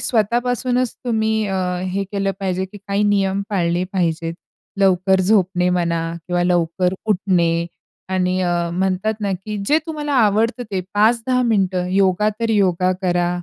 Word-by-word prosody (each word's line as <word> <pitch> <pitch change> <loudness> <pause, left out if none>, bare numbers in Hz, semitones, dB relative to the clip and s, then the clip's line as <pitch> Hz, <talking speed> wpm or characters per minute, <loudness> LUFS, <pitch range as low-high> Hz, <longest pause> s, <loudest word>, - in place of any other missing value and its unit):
स्वतःपासूनच 245 +2 +1
तुम्ही 220 -2 0
अ, 195 -1 -2 0.3
हे 195 +2 -2
केलं 195 -1 0
पाहिजे 190 -1 -1
की 190 +2 -11
काही 200 +1 +1
नियम 200 -1 +1
पाळले 175 -2 0
पाहिजेत. 165 -2 -1 0.5
लवकर 190 0 +3
झोपणे 185 -2 +2
म्हणा 170 -2 0 0.3
किंवा 175 0 +1
लवकर 180 +1 +1
उठणे 175 -4 +1 0.5
आणि 185 0 +1
अ, 175 -1 0
म्हणतात 190 +4 0
ना 200 -2 -1
की 210 -1 -4
जे 300 - +4
तुम्हाला 300 -2 -4
आवडतं 225 +4 0
ते 190 -2 -1
5-10 235 +4 +2
मिनिटं 190 -6 +1
योगा 195 +1 +3
तर 230 -1 0
योगा 185 -3 +2
करा 175 -1 +1
190 Hz, 145 wpm, -20 LUFS, 180-215 Hz, 0.5 s, जे